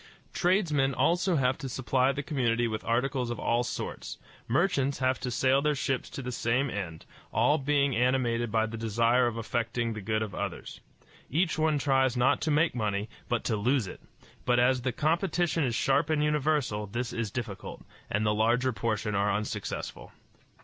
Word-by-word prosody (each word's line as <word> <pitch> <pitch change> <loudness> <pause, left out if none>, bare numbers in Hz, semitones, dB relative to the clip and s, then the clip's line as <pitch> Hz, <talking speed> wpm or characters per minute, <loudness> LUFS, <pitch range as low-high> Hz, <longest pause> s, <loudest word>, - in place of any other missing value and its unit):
Tradesmen 155 -8 +2
also 180 +1 +2
have 130 -2 +1
to 135 -1 -5
supply 130 +1 +1
the 140 +1 -4
community 120 -5 0
with 110 -1 -4
articles 125 +1 0
of 120 - -3
all 120 +1 +1
sorts; - - -5 0.3
merchants 140 -1 +1
have 130 -1 +1
to 125 - -3
sail 130 +3 +2
their 150 0 +1
ships 135 -1 -2
to 135 - -7
the 125 - -4
same 125 +3 0
end 85 -6 -5 0.3
all 125 +7 +3
being 140 -1 +1
animated 120 -2 +1
by 110 0 +2
the 115 0 -6
desire 115 +3 +2
of 115 -1 -3
effecting 115 0 -2
the 105 - -6
good 110 +2 0
of 105 -4 -6
others. - - -5 0.5
Each 165 +4 +1
one 155 -1 +2
tries 135 -3 +2
not 125 +2 +3
to 155 - -1
make 155 +2 +3
money, 105 -2 -2 0.2
but 120 -1 0
to 115 - 0
lose 120 +3 +1
it; 90 - -9 0.4
but 125 -1 +2
as 125 +1 +3
the 130 +1 -1
competition 170 - +1
is 120 -4 0
sharp 135 +6 +2
and 155 -1 +2
universal, 150 -8 0
this 120 +4 -4
is 115 -2 -2
difficult, 110 -4 -6 0.3
and 105 +1 0
the 105 - +3
larger 120 +4 +2
portion 110 -1 -2
are 100 +1 +1
unsuccessful. 105 +1 -4
125 Hz, 180 wpm, -29 LUFS, 115-140 Hz, 0.5 s, all